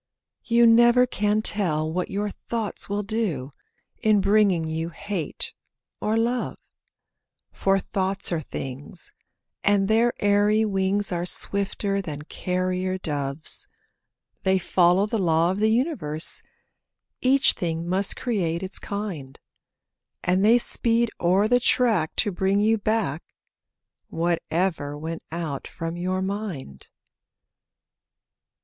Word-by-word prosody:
You 235 0 +4
never 240 +2 +6
can 210 -2 0
tell 160 -8 +1
what 180 +1 -2
your 205 +1 -2
thoughts 225 -2 -4
will 205 +1 -1
do, 190 - -2 0.5
In 215 -1 +4
bringing 195 -4 +3
you 160 +1 -3
hate 185 -1 -4 0.5
or 215 +1 0
love; 240 +2 -1 0.9
For 195 0 +1
thoughts 195 0 -1
are 165 -2 0
things, 135 +3 -7 0.5
and 200 -1 +3
their 230 +3 +3
airy 205 +2 +3
wings 195 0 +1
Are 175 0 -1
swifter 200 +1 0
than 150 -5 -6
carrier 185 +2 -2
doves. 145 -3 -2 0.7
They 190 0 +2
follow 180 +1 +3
the 220 +1 -2
law 165 -1 +2
of 190 - -3
the 215 +1 +3
universe— 220 - +1 0.8
Each 265 +1 +5
thing 165 -1 -3
must 190 +2 0
create 180 -8 -1
its 190 +1 -1
kind; 185 -10 -5 0.9
And 185 +2 +2
they 225 +3 +6
speed 235 -1 +1
o'er 185 +4 +3
the 245 +2 +4
track 225 -10 +2
to 210 - +1
bring 190 +2 +1
you 220 +1 +2
back 205 -8 -1 0.9
Whatever 165 -2 -1
went 160 +2 -5
out 160 -5 -4
from 165 0 -5
your 185 +2 -2
mind. 190 - -5
195 Hz, 120 wpm, -24 LUFS, 170-215 Hz, 0.9 s, never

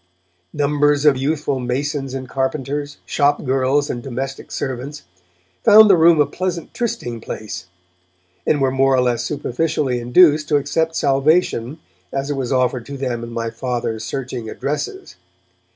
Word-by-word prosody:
Numbers 145 0 +1
of 145 -2 +6
youthful 140 0 -1
masons 135 +2 -2
and 130 -1 -5
carpenters, 140 +2 -3
shop 145 0 +1
girls 135 +2 +1
and 120 - -4
domestic 135 +2 -5
servants, 135 +1 -5 0.6
found 215 0 +8
the - - +7
Room 165 -1 +5
a 150 - +5
pleasant 175 -1 -4
trysting 120 - -3
place, 105 -5 -7 0.8
and 150 - +3
were 135 -1 +2
more 135 0 +3
or 130 - +3
less 120 -1 0
superficially 140 0 -1
induced 150 +5 +4
to 150 - +1
accept 160 +3 -1
salvation 140 -2 +1 0.3
as 135 +1 -2
it - - -1
was 130 -2 -3
offered 125 -2 0
to 140 0 -6
them 125 -3 -3
in 115 - -6
my 115 -1 -3
Father's 115 -2 -3
searching 120 -1 -5
addresses. 150 - -4
135 Hz, 150 wpm, -20 LUFS, 125-150 Hz, 0.8 s, found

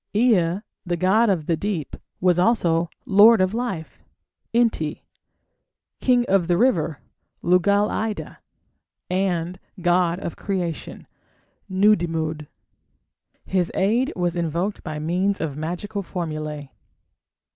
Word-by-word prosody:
Ea, 200 -6 +3 0.2
the 175 -2 -2
god 200 +6 +3
of 175 -6 0
the 165 - +1
deep, 170 -3 -3 0.2
was 180 -1 +3
also 175 -5 +2 0.2
"lord 210 +3 +7
of 185 +1 +2
life" 225 -9 -4 0.5
(Enti), 230 -10 0 1.0
"king 245 -2 +3
of 190 -3 +2
the 175 -1 +2
river" 165 - +1 0.4
(Lugal 200 +4 +3
ida), 215 -1 -4 0.7
and 180 -2 -1 0.2
god 175 0 +2
of 170 - -5
creation 180 -6 -4 0.6
(Nudimmud). 165 -6 +1 1.0
His 180 -2 0
aid 230 +7 +2
was 175 -1 -1
invoked 170 +4 -2
by 155 -2 -5
means 180 +6 0
of 155 -4 -3
magical 175 +7 -4
formulae. 155 -6 -5
180 Hz, 110 wpm, -23 LUFS, 165-205 Hz, 1.0 s, lord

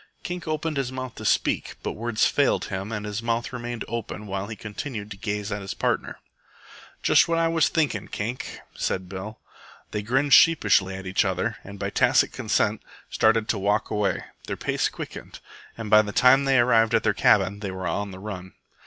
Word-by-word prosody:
Kink 175 -1 -5
opened 155 -1 -2
his 135 -2 -1
mouth 130 -2 -5
to 110 - -9
speak, - - +1
but - - -2
words 115 0 0
failed - - +2
him 95 +3 -4
and 105 -1 -4
his 105 +1 -3
mouth 115 +1 -2
remained 120 -1 -5
open 115 -2 -5
while 100 0 -4
he 110 - -6
continued 105 +1 -6
to - - -5
gaze 105 -1 -3
at 105 0 -3
his 95 - -5
partner. - - -1 0.9
"Just - - +5
what 165 0 +1
I 165 0 +3
was 165 -2 +2
thinken', 145 - 0
Kink," 115 +5 -5
said 95 -1 -2
Bill. 95 +4 -7 0.5
They 105 - -2
grinned 135 +6 +1
sheepishly 95 - +5
at 95 0 -8
each 95 +3 +2
other, 95 +4 -1
and 100 0 -10
by 100 0 -3
tacit - - +3
consent - - 0 0.3
started 110 0 +3
to 105 - +1
walk 100 +2 0
away. 105 -2 0 0.2
Their - - -3
pace - - 0
quickened, - - -8 0.4
and 110 -3 -6
by 105 0 +8
the 105 -1 -5
time 130 +5 +5
they 135 -1 +4
arrived 115 -2 +4
at - - +2
their - - +2
cabin 100 +1 +3
they 100 -2 -4
were 95 0 -5
on 100 +3 -2
the 95 - -9
run. 95 -2 -7
110 Hz, 195 wpm, -25 LUFS, 100-125 Hz, 0.9 s, by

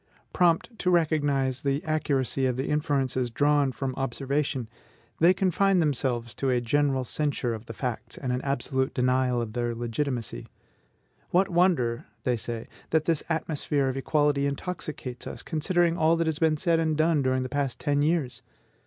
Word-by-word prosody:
Prompt 180 +6 +2
to 180 - +1
recognize 145 -6 +1
the 140 +1 0
accuracy 135 -4 0
of 125 - 0
the 135 - -2
inferences 135 -4 0
drawn 145 +2 +2
from 130 0 -3
observation, 135 0 -2 0.5
they 170 +3 +6
confine 190 +1 +2
themselves 130 -7 0
to 135 - -1
a 125 -1 +2
general 135 +2 +1
censure 135 -3 -1
of 110 +1 -8
the 115 - -6
facts, 125 0 -4
and 130 - -3
an 125 - -1
absolute 135 -1 -1
denial 125 -1 +2
of 115 -2 -4
their 120 0 -1
legitimacy. 120 - -3 0.8
"What 185 +2 +3
wonder," 170 -10 +2 0.2
they 125 - +1
say, 115 0 -5 0.2
"that 155 -1 +2
this 165 -3 +1
atmosphere 150 -4 0
of 130 - -3
equality 145 0 +1
intoxicates 140 -4 -5
us, - - -7
considering 170 +1 +1
all 160 +1 +4
that 165 0 0
has 160 -1 -1
been 160 -2 +3
said 165 +1 +2
and 160 -2 0
done 155 -1 +3
during 130 -1 +1
the - - -3
past 140 -1 -2
ten 145 -1 +1
years!... 150 -4 0
140 Hz, 165 wpm, -27 LUFS, 125-160 Hz, 0.8 s, they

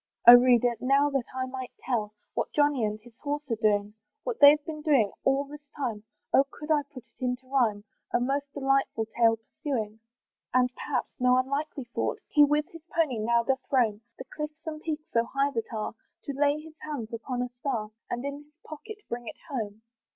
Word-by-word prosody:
Oh 240 - +14
reader! 245 -1 +6
now 275 +3 +3
that 270 -3 -1
I 260 0 -1
might 255 -1 -6 0.2
tell 215 -4 -1 0.2
What - - -2
Johnny 290 -4 +3
and 210 0 -2
his 240 -1 -16
horse 290 -2 -4
are - - +3
doing! 210 -2 +1 0.3
What - - -3
they've 295 +1 +8
been 305 -1 -5
doing 270 -10 +3
all 270 +1 +3
this 290 +1 -12
time, 230 -7 -3 0.3
Oh 270 - +7
could 300 +1 -6
I 300 -1 +4
put 255 -5 -10
it 240 +2 -14
into 250 +1 -1
rhyme, 235 -6 +1 0.3
A - - +3
most 280 +3 -1
delightful 270 -5 +1
tale 230 -1 +4
pursuing! 225 -2 -4 0.5
Perhaps, 250 +1 0
and - - -4
no 250 0 +6
unlikely 280 +2 -1
thought! - - -1
He 295 - +6
with 295 +1 +3
his 330 -2 -12
pony 315 -9 0
now 235 +2 +2
doth 265 +2 0
roam 225 -6 +2 0.2
The 260 - -8
cliffs 300 +1 -6
and 310 -1 -5
peaks 310 -1 -4
so 230 - +3
high 275 +3 0
that 230 -4 -3
are, 215 -2 -3 0.3
To 280 - -4
lay 290 +2 +2
his 315 0 -13
hands 255 -7 -5
upon 245 +2 -3
a 250 - -4
star, 245 -4 -3 0.2
And 240 +3 -3
in 280 0 -3
his 300 +1 -33
pocket 425 +8 -8
bring 240 0 -5
it - - -7
home. 220 -4 -4
260 Hz, 200 wpm, -28 LUFS, 235-290 Hz, 0.5 s, Oh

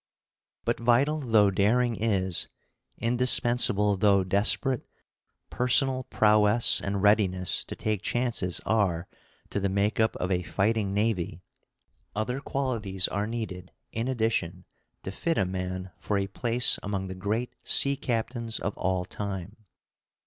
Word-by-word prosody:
But - - -1
vital 125 +6 +2
though 110 -7 +3
daring 115 +5 +2
is, 95 -5 -1 0.5
indispensable 120 -4 +3
though 100 -1 +3
desperate 105 +7 +1 0.7
personal 130 +1 +1
prowess 105 -1 +4
and 100 0 -3
readiness 95 -4 +2
to - - -7
take 105 -3 -2
chances 120 -7 -1
are 95 -6 0 0.4
to - - -1
the 100 0 -1
make 100 +3 0
up 110 0 +2
of 90 - -3
a 90 -1 +1
fighting 105 +2 -1
navy, 100 -4 -1 0.7
other 125 +5 -2
qualities 110 -11 -1
are 100 +2 -2
needed 100 -6 -6 0.2
in 115 +2 -3
addition 110 -8 -2 0.4
to 95 - -5
fit 165 - -2
a 95 - +2
man 90 0 -5
for 105 - -2
a 100 - 0
place 120 +4 +1
among 100 -2 -3
the 95 - -6
great 105 +6 -3
sea 140 0 +4
captains 115 -2 -3
of 100 - -4
all 95 -1 -1
time. 100 0 -6
105 Hz, 135 wpm, -27 LUFS, 95-120 Hz, 0.7 s, prowess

